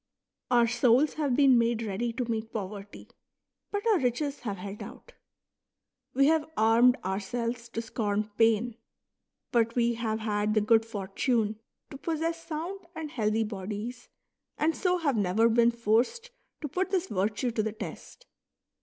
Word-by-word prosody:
Our 240 Hz, -2 st, +5 dB
souls 240 Hz, +4 st, +3 dB
have 285 Hz, -5 st, 0 dB
been 270 Hz, -3 st, +6 dB
made 230 Hz, 0 st, +1 dB
ready 220 Hz, +3 st, -2 dB
to 250 Hz, +1 st, -2 dB
meet 225 Hz, -1 st, -3 dB
poverty; 205 Hz, -1 st, -7 dB, 0.6 s
but 410 Hz, +1 st, -3 dB
our 415 Hz, -5 st, +4 dB
riches 275 Hz, +3 st, -1 dB
have 205 Hz, -5 st, -4 dB
held 200 Hz, +2 st, -7 dB
out. -, -, -11 dB, 1.0 s
We 275 Hz, +1 st, +5 dB
have 315 Hz, +1 st, +2 dB
armed 235 Hz, +4 st, +5 dB
ourselves 230 Hz, +5 st, -3 dB
to 230 Hz, 0 st, -4 dB
scorn 210 Hz, -2 st, -2 dB
pain; 225 Hz, +1 st, +2 dB, 0.7 s
but 230 Hz, -1 st, +2 dB
we 235 Hz, -1 st, +2 dB
have 225 Hz, -2 st, -2 dB
had 210 Hz, 0 st, 0 dB
the 215 Hz, -, +4 dB
good 225 Hz, +1 st, +3 dB
fortune 215 Hz, +2 st, -1 dB, 0.3 s
to 275 Hz, -, -8 dB
possess 330 Hz, +1 st, -2 dB
sound 335 Hz, +5 st, -4 dB, 0.2 s
and 315 Hz, -2 st, -5 dB
healthy 220 Hz, -5 st, +1 dB
bodies, 210 Hz, +4 st, -6 dB, 0.5 s
and 320 Hz, +2 st, +1 dB
so 360 Hz, -1 st, +1 dB
have 285 Hz, -8 st, 0 dB
never 205 Hz, +3 st, +3 dB
been 235 Hz, +1 st, +4 dB
forced 235 Hz, -, 0 dB, 0.3 s
to 300 Hz, -, -3 dB
put 370 Hz, +7 st, -1 dB
this 375 Hz, -2 st, 0 dB
virtue 210 Hz, -, -1 dB
to 225 Hz, -, 0 dB
the 220 Hz, 0 st, -2 dB
test. 220 Hz, -, -9 dB
235 Hz, 155 wpm, -28 LUFS, 215-275 Hz, 1.0 s, been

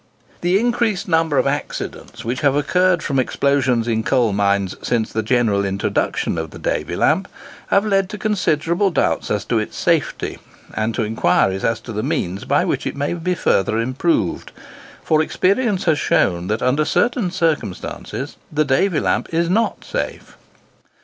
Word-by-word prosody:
The 180 Hz, +3 st, +3 dB
increased 230 Hz, -4 st, 0 dB
number 160 Hz, -4 st, +2 dB
of -, -, +3 dB
accidents 140 Hz, -4 st, -4 dB
which 120 Hz, +2 st, -2 dB
have 140 Hz, -1 st, +3 dB
occurred 180 Hz, +4 st, +2 dB
from 135 Hz, -2 st, 0 dB
explosions 130 Hz, -3 st, +1 dB
in 110 Hz, -1 st, +1 dB
coal 120 Hz, -3 st, +2 dB
mines 100 Hz, -1 st, +1 dB
since 115 Hz, -3 st, -1 dB
the 110 Hz, -, 0 dB
general 110 Hz, -3 st, +1 dB
introduction 95 Hz, -3 st, -1 dB
of 80 Hz, -1 st, -4 dB
the -, -, -11 dB
Davy -, -, -2 dB
lamp, -, -, +2 dB, 0.4 s
have 200 Hz, +2 st, +3 dB
led 195 Hz, -2 st, +1 dB
to 210 Hz, -, -6 dB
considerable 190 Hz, -3 st, +1 dB
doubts 80 Hz, -, 0 dB
as -, -, -1 dB
to -, -, +1 dB
its -, -, -5 dB
safety, -, -, 0 dB, 0.3 s
and 110 Hz, +1 st, -1 dB
to 115 Hz, -, 0 dB
inquiries 95 Hz, -3 st, +1 dB
as 115 Hz, -1 st, +1 dB
to 115 Hz, -, -8 dB
the 105 Hz, -, -2 dB
means 100 Hz, -, -2 dB
by -, -, +2 dB
which -, -, -1 dB
it -, -, -4 dB
may 145 Hz, +3 st, -1 dB
be 175 Hz, +1 st, -1 dB
further 110 Hz, -, +1 dB
improved; 125 Hz, -, 0 dB, 0.5 s
for 155 Hz, -1 st, +3 dB
experience 200 Hz, +5 st, +1 dB
has 160 Hz, -4 st, +2 dB
shown 85 Hz, -1 st, +1 dB
that, 110 Hz, +2 st, -1 dB
under 130 Hz, +4 st, +2 dB
certain 235 Hz, +3 st, +1 dB
circumstances, 160 Hz, -, -3 dB
the 155 Hz, 0 st, +1 dB
Davy 150 Hz, +5 st, +2 dB
lamp -, -, -1 dB
is 170 Hz, +1 st, +1 dB
not 225 Hz, +4 st, 0 dB
safe. -, -, -4 dB
140 Hz, 165 wpm, -20 LUFS, 110-180 Hz, 0.5 s, The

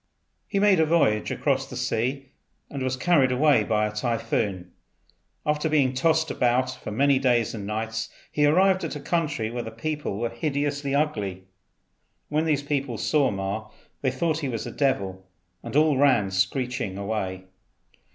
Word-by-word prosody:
He 200 Hz, -, -2 dB
made 200 Hz, -3 st, +4 dB
a 160 Hz, -, +5 dB
voyage 110 Hz, -10 st, +2 dB
across 135 Hz, -2 st, 0 dB
the -, -, -8 dB
sea, 125 Hz, +3 st, -2 dB, 0.4 s
and 140 Hz, -, -5 dB
was 130 Hz, 0 st, -1 dB
carried 140 Hz, -3 st, +3 dB
away 135 Hz, -3 st, +4 dB
by 105 Hz, 0 st, +1 dB
a 105 Hz, -, -3 dB
typhoon. 105 Hz, -5 st, -2 dB, 0.7 s
After 150 Hz, +1 st, 0 dB
being 140 Hz, -4 st, +2 dB
tossed 160 Hz, +4 st, +2 dB
about 125 Hz, +1 st, +1 dB
for -, -, -8 dB
many 135 Hz, +5 st, +3 dB
days 120 Hz, -4 st, +2 dB
and 100 Hz, -3 st, -6 dB
nights 110 Hz, +1 st, -3 dB, 0.2 s
he 150 Hz, 0 st, +3 dB
arrived 185 Hz, +4 st, +4 dB
at 160 Hz, -, -3 dB
a -, -, -5 dB
country 145 Hz, -7 st, -1 dB
where 120 Hz, 0 st, -3 dB
the 115 Hz, -, -6 dB
people 145 Hz, -1 st, -4 dB
were 115 Hz, +2 st, -1 dB
hideously 145 Hz, -2 st, -1 dB
ugly. 105 Hz, -11 st, -1 dB, 0.9 s
When 155 Hz, +2 st, +1 dB
these 150 Hz, -3 st, +1 dB
people 140 Hz, -5 st, -2 dB
saw 145 Hz, +1 st, +2 dB
Ma 100 Hz, +2 st, -4 dB, 0.3 s
they 135 Hz, -, +2 dB
thought 155 Hz, +5 st, -1 dB
he 140 Hz, -4 st, -2 dB
was 115 Hz, -3 st, -3 dB
a -, -, -5 dB
devil 100 Hz, -10 st, -1 dB, 0.4 s
and -, -, -7 dB
all 150 Hz, -2 st, +4 dB
ran 125 Hz, -9 st, +3 dB
screeching 100 Hz, +1 st, -1 dB
away. 100 Hz, -2 st, -3 dB
130 Hz, 165 wpm, -25 LUFS, 110-150 Hz, 0.9 s, a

